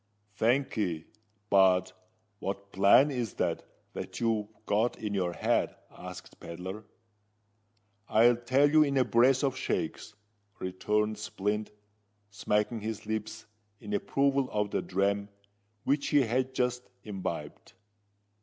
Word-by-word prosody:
"Thank'ee. 110 - 0 0.5
But 95 -1 +4 0.5
what 100 +1 -5
plan 100 +10 +5
is 120 -5 -3
it - - 0 0.3
that - - -6
you've 110 -3 0 0.2
got 110 +4 +1
in 105 -2 -4
your 90 -3 0
head?" - - 0 0.2
asked - - -10
Pedler. 95 +5 -7 1.2
"I'll 120 +2 +5
tell 130 +4 +3
you 155 0 +6
in 140 -2 +2
a 130 - +5
brace 130 +4 +4
of 135 -2 +1
shakes," 130 -3 -3 0.4
returned 105 +3 -1
Splint, 105 +1 -2 0.6
smacking 105 +3 0
his 110 0 -5
lips 110 0 -4 0.3
in 210 - -7
approval 140 -8 +1
of 105 -1 -1
the - - 0
dram 100 +2 0 0.5
which 140 +1 +1
he 145 - +4
had 130 +3 -1
just 125 -1 -1
imbibed. 90 -7 -6
110 Hz, 120 wpm, -30 LUFS, 100-130 Hz, 1.2 s, you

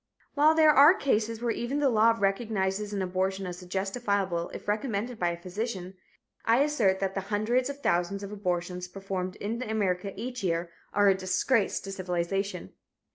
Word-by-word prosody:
While 305 +2 +5
there 310 -1 +7
are 295 +5 +8
cases 230 - 0
where 235 - +1
even 240 +5 -2
the 290 -1 +3
law 225 +1 +4
recognizes 200 -1 -1
an 200 -2 -1
abortion 190 +1 -1
as 180 0 -6
justifiable 195 -2 -1
if - - -9
recommended 215 +2 -2
by 175 - +2
a 170 - -3
physician, 190 0 -5 0.5
I 235 +4 +4
assert 225 -11 +2
that 195 -1 -1
the 195 - -2
hundreds 215 +6 0
of 280 0 -7
thousands 175 +3 0
of 200 - -6
abortions 180 -3 -3
performed 185 -1 -4
in 225 +4 -4
America 200 -5 -1
each 245 +2 -5
year 170 -1 -1 0.2
are 205 0 +3
a - - +6
disgrace 190 +4 +1
to 195 - -7
civilization. 190 +2 -3
200 Hz, 170 wpm, -28 LUFS, 185-230 Hz, 0.5 s, are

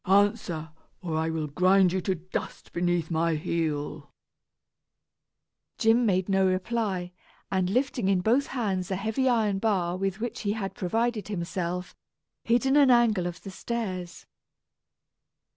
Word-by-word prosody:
Answer, 195 -5 +2 0.3
or 165 -3 -2
I 160 +1 0
will 160 -1 -2
grind 185 +4 +3
you 190 - 0
to 190 +1 0
dust 180 +2 -6
beneath 175 -1 0
my 165 0 +1
heel!" 155 -2 -3 1.7
Jim 230 +1 +3
made 185 -2 +1
no 195 -1 +3
reply, 185 -1 -1 0.4
and 185 -1 +1
lifting 250 -1 0
in 195 -2 +3
both 245 +8 +2
hands 195 -8 -2
a 190 - 0
heavy 220 +7 0
iron 215 -5 +2
bar 185 -5 +1
with 195 +1 -2
which 235 +1 -4
he 205 -1 -1
had 200 -3 -4
provided 225 +4 -1
himself, 180 -2 -3 0.5
hid 240 +3 +2
in 270 +2 +4
an 280 -2 +6
angle 230 -7 +4
of 175 0 -7
the 195 - -7
stairs. 190 -4 -4
190 Hz, 145 wpm, -27 LUFS, 175-225 Hz, 1.7 s, an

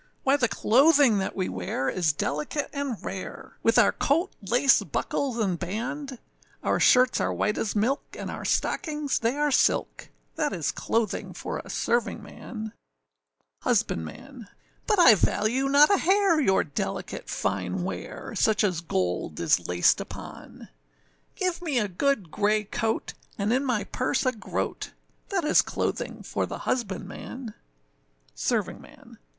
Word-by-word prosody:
Why 270 +1 +4
the 260 -4 +2
clothing 265 0 +4
that 190 - -3
we 185 -2 -1
wear 95 +8 -3
is 175 -4 +1
delicate 150 - -3
and 280 -5 -2
rare, 190 -1 -7
With 230 - +3
our 235 -4 +6
coat, 330 +7 0
lace, 245 +7 +4
buckles, 265 -4 -2
and 190 -7 0
band; 250 +9 -4 0.5
Our - - +1
shirts 255 0 +5
are - - 0
white 210 - 0
as 220 - -2
milk, 235 +7 +1 0.2
and - - -5
our - - -6
stockings 300 -3 -1
they 230 +3 0
are 295 0 +1
silk, - - +1 0.3
That 295 -2 0
is 155 -5 -1
clothing 225 -3 -2
for - - -5
a - - -10
servingman. 220 -1 -3 0.9
HUSBANDMAN. 230 - -2 0.4
But 420 - +3
I 340 -10 +9
value 235 +6 +1
not 290 +4 +6
a 395 - +3
hair 380 -3 +3
your 190 -8 +3
delicate 145 - -4
fine 95 -3 -2
wear, - - -6
Such 215 -1 +2
as 180 -5 0
gold 90 - -2
is 85 +1 +2
laced 90 0 +3
upon; - - -10 0.7
Give 365 -1 -1
me 310 -7 -1
a 215 -3 +2
good 200 - 0
grey 210 +1 +1
coat, 220 +2 -2 0.2
and 205 +3 +1
in 260 +2 +2
my 245 -6 0
purse 260 +2 -1
a 255 - +3
groat, 225 - -4 0.4
That 380 -5 -1
is 305 - +5
clothing - - -3
for - - -2
the - - -6
husbandman. 220 +1 -4 0.8
SERVINGMAN. - - -4
230 Hz, 145 wpm, -26 LUFS, 190-280 Hz, 0.9 s, I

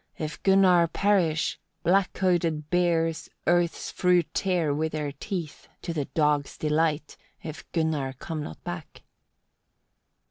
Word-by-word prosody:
if 155 0 -5
Gunnar 185 -3 +5
perish; 170 -4 +1 0.2
black 185 +2 +3
coated 165 -5 0
bears 165 -2 +1 0.2
earth's 175 0 +1
fruit 180 -2 +3
tear 175 -6 +1
with 160 +2 -1
their 150 -2 -2
teeth, 160 +2 -6 0.2
to 170 - -3
the 150 -4 -1
dogs' 150 -2 0
delight, 155 0 0 0.3
if 155 +1 -8
Gunnar 155 -5 0
come 155 +4 -5
not 80 - -8
back." - - -7
165 Hz, 120 wpm, -27 LUFS, 150-175 Hz, 0.3 s, Gunnar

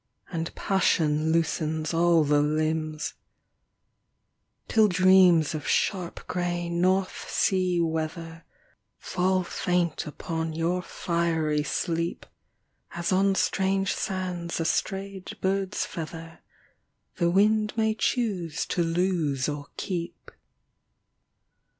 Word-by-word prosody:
And 165 -2 -4
passion 160 -5 +1
loosens 160 -1 0
all 170 -1 +4
the 145 0 +3
limbs; 155 +1 -1 1.5
Till 220 -1 +4
dreams 185 -4 +5
of 155 -2 -5
sharp 180 -4 -1
grey 175 -1 -2
north 185 +2 0
sea 185 -2 +1
weather 165 0 -3 0.5
Fall 185 0 0
faint 175 -3 -1
upon 160 +1 -4
your 170 +3 0
fiery 165 -4 -1
sleep. 170 +2 -2 0.7
As 170 +1 -2
on 195 +1 +3
strange 195 0 +1
sands 180 -3 -3
a 165 - -1
strayed 195 +3 -2
bird's 190 0 -1
feather 165 0 -7 0.8
The 170 - +2
wind 210 +3 +3
may 220 -1 +2
choose 205 - -1
to 175 - 0
lose 165 -5 0
or 145 -1 -4
keep. 175 -4 -5
170 Hz, 100 wpm, -26 LUFS, 160-185 Hz, 1.5 s, dreams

